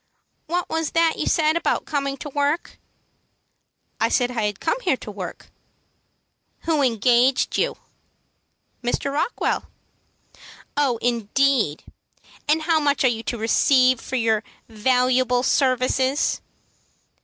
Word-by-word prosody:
"What 350 +2 -1
was 320 -1 -2
that 330 -1 +2
you - - -1
said 310 -1 +2
about 335 - 0
coming 275 -2 -2
to 295 - -7
work?" 290 +3 -2 1.2
"I - - +2
said 245 -1 +1
I 225 -4 -1
had 205 -1 -5
come 335 +10 -1
here - - +1
to - - -9
work." - - -8 1.1
"Who 320 -3 0
engaged 245 +1 +2
you?" - - 0 1.1
"Mr. 260 +3 -1
Rockwell." 305 +11 -1 1.1
"Oh, 275 -5 +1
indeed! 235 - +1 0.6
And 310 +2 +2
how 320 0 +2
much 290 -2 +1
are - - +5
you 225 -2 -3
to 240 - -4
receive 255 +2 +3
for 260 - -5
your 225 -3 +1 0.2
valuable 250 +2 +1
services?" 260 +1 +1
260 Hz, 120 wpm, -22 LUFS, 245-295 Hz, 1.2 s, are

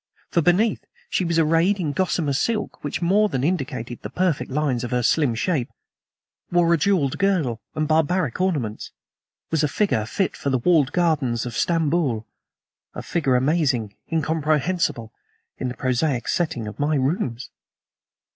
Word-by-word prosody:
For 170 - +3
beneath, 190 +7 +2 0.3
she - - +1
was 170 -1 0
arrayed 165 +5 +3
in 160 -5 -1
gossamer 165 -3 0
silk 215 +10 -2
which 145 +4 -3
more 205 +5 +3
than 130 -6 -2
indicated 135 -7 -2
the - - -6
perfect 180 -5 0
lines 135 -3 0
of 120 - -3
her 125 -1 0
slim 140 -2 +2
shape; 135 0 -1 0.8
wore 175 -1 +4
a - - +4
jeweled 150 -6 +1
girdle 165 - +1
and 155 0 0
barbaric 160 -1 +1
ornaments; 145 - -2 0.6
was 160 -2 +2
a - - +3
figure 140 - 0
fit 190 - -1
for 140 - -3
the 130 - +2
walled 150 +1 +3
gardens 150 -10 +1
of 120 -2 -5
Stamboul 160 -9 +1 0.7
a - - -5
figure 150 -7 0
amazing, 130 -6 +1 0.2
incomprehensible, 155 -5 0 0.5
in 130 - -2
the 125 - -5
prosaic 130 -1 0
setting 155 -10 -1
of 105 - -8
my 150 +2 +1
rooms. 135 - -1
150 Hz, 155 wpm, -23 LUFS, 130-175 Hz, 0.8 s, wore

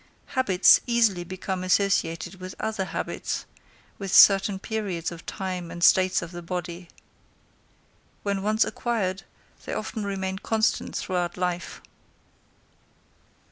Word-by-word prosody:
Habits 200 -8 +5
easily 225 -7 +2
become 185 +1 -4
associated 185 -1 0
with 185 +1 -7
other 215 -3 -2
habits, - - -4 0.5
with 195 -2 -4
certain 195 0 +7
periods 195 -5 -3
of 170 0 -11
time 185 -3 -4
and 170 0 -6
states 185 -1 +4
of 170 - -8
the 175 -1 -7
body. 175 0 -5 1.4
When 200 -1 -1
once 215 +2 +2
acquired, 195 -6 -2 0.4
they - - -4
often 220 -4 -4
remain 190 -1 -3
constant 220 +1 0
throughout 175 -2 -2
life. 180 -1 -3
190 Hz, 115 wpm, -26 LUFS, 180-200 Hz, 1.4 s, certain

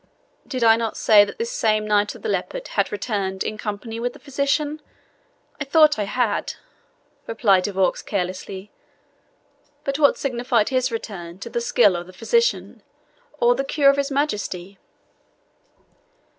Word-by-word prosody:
"Did 255 -3 -2
I 225 -1 +6
not 225 -2 -3
say 210 -2 +6
that 205 - -6
this 465 +1 -3
same 215 - +1
Knight 205 -1 +1
of - - -14
the - - -2
Leopard - - -3
had - - 0
returned 200 -3 -2
in 215 - -3
company 220 +1 -5
with 245 +1 -2
the - - -14
physician? 290 +2 -1 0.8
I - - -1
thought 300 -2 +4
I 205 - 0
had," 230 0 -1 0.7
replied 200 -5 +2
De 205 - -2
Vaux 190 -1 +1
carelessly. 190 +1 -4 1.1
"But 275 +1 -2
what 285 -2 +4
signified 245 -4 0
his 255 -1 0
return 185 -6 -6
to 235 - -7
the 235 - -1
skill 235 -5 +3
of 175 0 -5
the 185 - -13
physician, 465 - 0 0.6
or 240 +1 +5
the 270 - -2
cure 275 0 +4
of 275 - -4
his 280 0 0
Majesty?" 205 -9 -3
230 Hz, 155 wpm, -22 LUFS, 205-275 Hz, 1.1 s, I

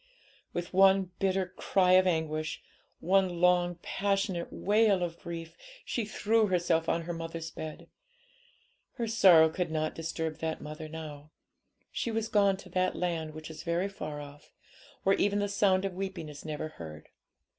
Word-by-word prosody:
With 175 +1 -4
one 190 -1 +5
bitter 190 -1 0
cry 185 -2 +2
of 185 0 +6
anguish, 155 -2 -1 0.4
one 185 -1 +2
long, 175 0 +3
passionate 195 -3 -1
wail 205 -2 +3
of 170 -1 -4
grief, 165 -1 -7 0.3
she 235 - -2
threw 215 +1 +2
herself 170 -3 +1
on 165 - 0
her 175 +1 -4
mother's 165 0 -5
bed. 155 -1 -7 1.1
Her 240 -3 -2
sorrow 185 -8 +7
could 175 +2 -2
not 155 0 -1
disturb 160 -1 -4
that 160 -1 -2
mother 155 +1 -7
now; 155 -2 -8 0.6
she - - -2
was 225 0 -2
gone 200 -2 +3
to - - -12
that 185 0 0
land 165 -3 -2
which 155 0 -8
is 155 -1 -8
very 170 +3 0
far 150 -6 -6
off, 145 0 -12 0.5
where 195 +1 +3
even 205 0 +2
the 205 0 +1
sound 195 -1 +2
of 195 - -2
weeping 190 -4 -5
is 145 -1 -10
never 155 0 -4
heard. 80 - -10
175 Hz, 160 wpm, -30 LUFS, 160-195 Hz, 1.1 s, sorrow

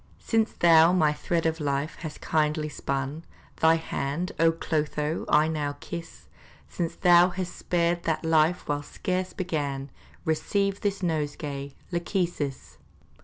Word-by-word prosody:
Since 225 -1 0
thou 165 0 +6
my 155 -5 +3
thread 165 +2 -1
of 160 0 0
life 140 +1 -2
hast 155 -2 -7
kindly 155 0 0
spun, 140 +2 -3 0.3
Thy 160 0 +5
hand, 160 +1 -3
O 165 0 +5
Clotho, 155 -1 -2
I 150 +1 +5
now 150 -3 -2
kiss! 170 +1 -8 0.4
Since 170 -2 -3
thou 175 -1 +6
hast 180 0 -5
spared 170 0 0
that 160 0 -1
life 160 +2 +3
whilst 145 0 -3
scarce 185 0 -2
begun, 145 -7 -3 0.3
Receive 200 +5 0
this 200 -1 -1
nosegay, 145 -4 -3 0.2
Lachesis! 170 -6 -2
160 Hz, 130 wpm, -27 LUFS, 150-175 Hz, 0.4 s, thou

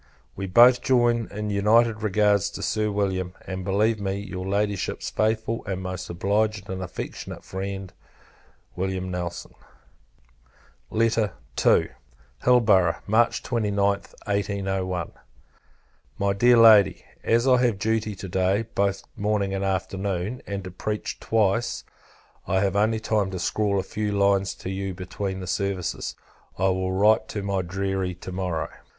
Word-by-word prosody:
We 95 0 -4
both 120 +6 +6
join 120 -3 +2
in 105 0 -4
united 110 +2 +3
regards 105 -1 +2
to - - -6
Sir 105 0 0
William; 95 -3 -1
and 95 -1 -5
believe 105 +4 +1
me, 95 -1 -1
your 95 -2 -5
Ladyship's 100 0 -1
faithful 110 +1 0
and 95 -1 -3
most 95 -1 -5
obliged 100 +3 0
and 95 0 -4
affectionate 90 -2 -7
friend, 95 0 -5 0.8
Wm. 95 0 -2
NELSON. 90 -1 -5 1.4
II. 110 - +1 0.5
Hilborough, 105 -9 +4
March 115 +3 +2
29th, 100 -4 0
1801. 95 -3 -2 1.1
My 100 0 +1
Dear 120 +4 +5
Lady, 110 -3 +6 0.2
As 115 +3 +2
I 125 -1 +5
have 120 -5 +2
duty 110 0 -1
to 95 - -7
day, 95 +4 +1
both 100 -1 0
morning 105 -1 0
and 95 0 -2
afternoon, 95 +3 -2
and 100 -1 -4
to 95 - -7
preach 105 +4 -4
twice, 115 +2 0 0.6
I 95 0 +2
have 100 -1 0
only 110 +2 +2
time 110 -3 0
to 95 - -5
scrawl 100 +2 0
a - - -1
few 105 0 -3
lines 100 -1 +2
to 95 - -6
you 95 -1 -4
between 95 +1 -4
the - - -5
services. 95 -1 -2 0.4
I 95 +1 +2
will 95 0 -1
write 105 +3 +3
to 105 - -4
my 100 -1 0
deary 95 0 -2
to 90 - -9
morrow. 90 -4 -2
100 Hz, 140 wpm, -25 LUFS, 95-110 Hz, 1.4 s, both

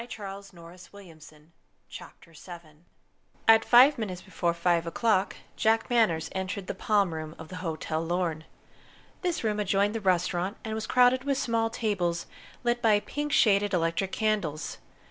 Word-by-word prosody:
CHAPTER 230 -3 -9 0.2
VII 195 -3 -17
WHAT 175 +2 -14
JULIET 180 -6 -14
TOLD 150 -1 -20 0.5
JACK 170 +1 -12 0.8
At 225 0 +7
five 255 +3 +6
minutes 185 -5 -5
before 170 -2 -2
five 170 -1 +1
o'clock 200 +2 +1 0.2
Jack 225 +3 +1
Manners 175 -10 +2
entered 190 +1 -4
the - - -4
Palm 200 -5 +1
Room 155 0 -6
of 160 -1 -11
the 180 - -7
Hotel 160 -2 -3
Lorne. 165 -2 -2 0.8
This 355 -7 -2
room 210 -1 -1
adjoined 200 +1 +1
the 225 - -3
restaurant, 185 +1 0
and 220 - -4
was 220 0 -4
crowded 250 +1 +4
with 275 -1 0
small 230 -3 0
tables 185 -7 -2 0.4
lit 240 0 0
by 215 -3 +4
pink 295 +5 -4
shaded 205 -7 +3
electric 165 +3 -1
candles. 200 -10 -2
195 Hz, 155 wpm, -27 LUFS, 170-225 Hz, 0.8 s, At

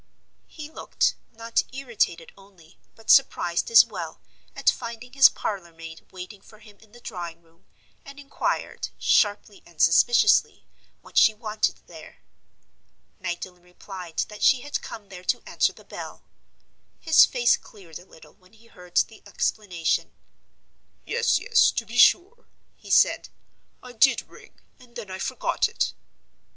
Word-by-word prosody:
He 305 -2 -10
looked, 315 - -1 0.2
not 230 0 -1
irritated 235 -11 -2
only, 190 -4 -21 0.2
but 225 - -1
surprised 175 -10 +3
as 230 -1 +8
well, - - -8 0.4
at - - -10
finding 235 +2 -1
his 275 0 +8
parlor 190 -5 -5
maid 165 0 -12
waiting 190 +2 -10
for 215 - -18
him 210 -2 -18
in 220 -1 -22
the 240 - -16
drawing 170 -7 -8
room, 165 0 -30 0.4
and 280 +1 -13
inquired, 280 0 -3
sharply 205 -1 +1
and 170 -2 -21
suspiciously, 235 +8 +3 0.4
what - - 0
she 220 - +5
wanted 215 -1 -2
there? - - -14 1.0
Magdalen 180 -1 -6
replied 180 -1 -11
that 210 -1 -12
she 260 -3 +4
had 290 +2 -4
come 205 -3 -10
there 180 -2 -11
to - - -1
answer - - +1
the - - -18
bell. - - -9 0.8
His 320 -1 +6
face 240 -2 +2
cleared 175 -7 -13
a 180 - -17
little 160 - -18
when 185 -1 -26
he 225 +1 -22
heard 180 -5 -10
the 220 - 0
explanation. 180 -6 -2 0.9
"Yes, - - +1
yes; 465 -2 +3
to - - -3
be - - -3
sure," 430 +7 +4 0.3
he - - -16
said. - - +3 0.5
"I 250 - -11
did 245 +3 +3
ring, - - -18 0.2
and 240 -1 -20
then 210 -5 -8
I 185 - -6
forgot - - -1
it." - - -2
210 Hz, 150 wpm, -24 LUFS, 180-240 Hz, 1.0 s, as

